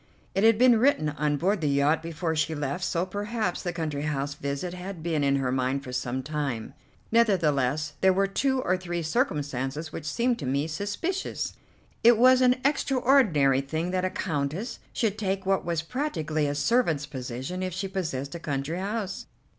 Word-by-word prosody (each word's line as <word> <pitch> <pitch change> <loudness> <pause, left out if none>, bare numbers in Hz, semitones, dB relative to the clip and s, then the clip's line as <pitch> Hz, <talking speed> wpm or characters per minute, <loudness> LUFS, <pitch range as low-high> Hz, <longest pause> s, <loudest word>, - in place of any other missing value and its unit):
It 195 - +1
had 225 -1 +6
been 245 -1 +6
written 230 - +3
on 150 0 0
board 190 +6 +1
the 150 - +1
yacht 140 +3 +2
before 165 0 -3
she 160 +1 0
left, 145 +4 -3
so 175 -1 0
perhaps 205 0 -2
the 175 - -2
country 155 -4 -3
house 145 -1 -2
visit 140 +6 -4
had 180 -2 -7
been 160 -3 0
in 140 0 +3
her 135 -2 0
mind 130 +1 0
for 125 -2 -8
some 125 +1 -2
time; 140 -6 -3 0.4
nevertheless 155 - +2
there 190 - +6
were 195 +1 +2
two 260 +6 0
or 185 - +2
three 175 -2 -4
circumstances 150 - -1
which 155 - -6
seemed 235 +9 0
to 140 - -4
me 140 +3 +1
suspicious. 205 - -3 0.5
It 235 0 +7
was 255 +2 +6
an 250 0 +5
extraordinary 245 - +3
thing 160 +6 -3
that 185 0 0
a 185 - +1
Countess 160 - -3
should 215 -2 -1
take 195 -2 -1
what 195 0 +1
was 165 -2 -1
practically 160 - -1
a 145 - -2
servant's 160 - +2
position 130 +5 -5
if 185 0 -2
she 190 +3 -3
possessed 160 -8 -3
a 170 - -5
country 150 +2 -3
house. 200 0 -3
165 Hz, 180 wpm, -27 LUFS, 145-200 Hz, 0.5 s, It